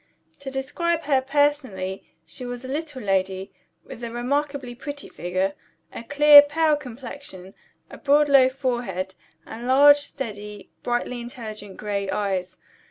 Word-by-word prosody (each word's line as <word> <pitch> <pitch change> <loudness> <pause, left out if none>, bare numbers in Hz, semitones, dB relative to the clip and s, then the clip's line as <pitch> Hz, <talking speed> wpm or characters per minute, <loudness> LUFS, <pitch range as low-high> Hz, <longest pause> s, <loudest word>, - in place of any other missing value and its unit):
To 280 - -6
describe 330 +6 -2
her 275 -3 +2
personally, 265 -9 0 0.2
she 165 +10 -10
was 245 +1 -6
a - - -6
little 290 -2 -4
lady, 190 -1 -1 0.3
with 240 - -11
a 235 - -3
remarkably 270 +2 -2
pretty 285 +3 -7
figure, 185 +2 -2 0.4
a - - -6
clear 290 +3 +8
pale 305 +1 +2
complexion, 245 -7 -9 0.3
a - - -12
broad 295 0 +4
low 270 -2 +6
forehead, 240 -8 -3 0.3
and 235 +2 -8
large, 285 +3 +7
steady, 210 -8 -7
brightly 240 0 -2
intelligent 215 -5 -8
gray 200 -2 -3
eyes. 190 -3 -2
250 Hz, 135 wpm, -24 LUFS, 205-285 Hz, 0.4 s, clear